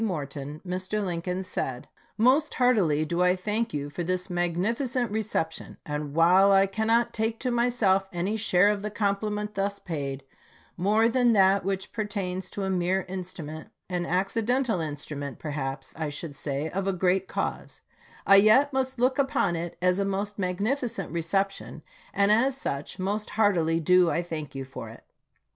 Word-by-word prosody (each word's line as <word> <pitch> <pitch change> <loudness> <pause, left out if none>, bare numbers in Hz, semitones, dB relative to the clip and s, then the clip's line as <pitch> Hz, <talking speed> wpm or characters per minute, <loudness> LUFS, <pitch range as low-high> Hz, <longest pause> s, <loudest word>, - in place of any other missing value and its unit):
Morton, 150 -5 -4
Mr. 185 +3 -2
Lincoln 180 +1 -3
said: 130 -8 -4 0.3
Most 265 +7 +3
heartily 195 - +3
do 170 +3 -1
I 180 0 +4
thank 210 +5 -1
you 145 -1 -3
for 175 - -4
this 180 +2 -2
magnificent 210 +8 -1
re 220 +1 0
ception, 160 -6 -3
and 150 -1 -4
while 180 +4 +6
I 195 0 +6
cannot 225 +4 +1
take 225 +1 -1
to 255 - 0
myself 235 -6 +2
any 185 +5 -1
share 200 -3 +3
of 205 -1 0
the 210 - -3
compliment 210 0 -1
thus 200 0 -1
paid, 140 -7 -5 0.5
more 210 +5 +3
than 240 0 +3
that 195 -1 +4
which 190 0 -3
pertains 190 -4 -3
to 200 - -5
a 190 - -1
mere 185 +1 0
instrument, 175 -4 -7 0.2
an 175 -1 -2
accidental 225 +5 0
instrument 145 -3 -5
perhaps 135 -3 -4
I 155 -2 -3
should 145 0 -6
say, 145 +1 -3
of 195 +3 -3
a 195 - +1
great 185 +1 +1
cause, - - -4 0.4
I 195 - +8
yet 240 +8 +6
must 260 0 -1
look 255 +3 +2
upon 265 -10 +1
it 170 0 -5
as 180 +1 +3
a - - +2
most 200 +1 -3
magnificent 210 +8 -2
reception, 195 +4 -2 0.3
and 200 +1 +3
as 255 +5 +3
such 140 - -4
most 205 +3 -2
heartily 170 -7 +3
do 180 +2 +4
I 170 - 0
thank 155 -5 -6
you 135 0 -4
for 130 - -8
it. - - -13
190 Hz, 165 wpm, -27 LUFS, 170-215 Hz, 0.5 s, I